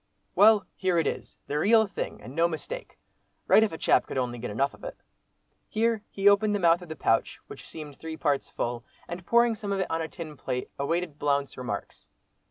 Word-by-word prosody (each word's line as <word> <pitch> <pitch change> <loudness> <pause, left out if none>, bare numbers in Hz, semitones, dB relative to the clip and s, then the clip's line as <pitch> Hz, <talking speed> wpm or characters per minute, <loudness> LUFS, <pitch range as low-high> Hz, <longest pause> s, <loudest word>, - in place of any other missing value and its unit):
"Well, 210 -1 +6
here 185 -2 +1
it 165 - +2
is—the 145 - -4
real 220 +5 +5
thing, 195 - -6
and 125 +5 -9
no 165 +3 +3
mistake. 445 - -6 0.5
Right - - +6
if 220 - +2
a 160 - -6
chap - - +3
could - - -5
only 120 -2 -2
get - - -4
enough 135 +7 0
of - - -17
it." - - -7 0.7
Here 225 0 +1
he 195 0 0
opened 205 +1 +5
the - - 0
mouth 170 0 +4
of 175 - -11
the 160 - -5
pouch, 115 -5 +1
which - - -11
seemed 150 -3 -9
three 160 0 -6
parts 145 -3 0
full, 120 0 -3 0.2
and 175 +2 -6
pouring 235 0 +4
some 205 -2 -5
of 195 - 0
it 190 - -2
on 165 0 0
a 160 - -2
tin 160 -2 -8
plate, 125 0 -4
awaited 165 +1 -2
Blount's 140 -1 0
remarks. 125 - -6
165 Hz, 210 wpm, -27 LUFS, 145-205 Hz, 0.7 s, Well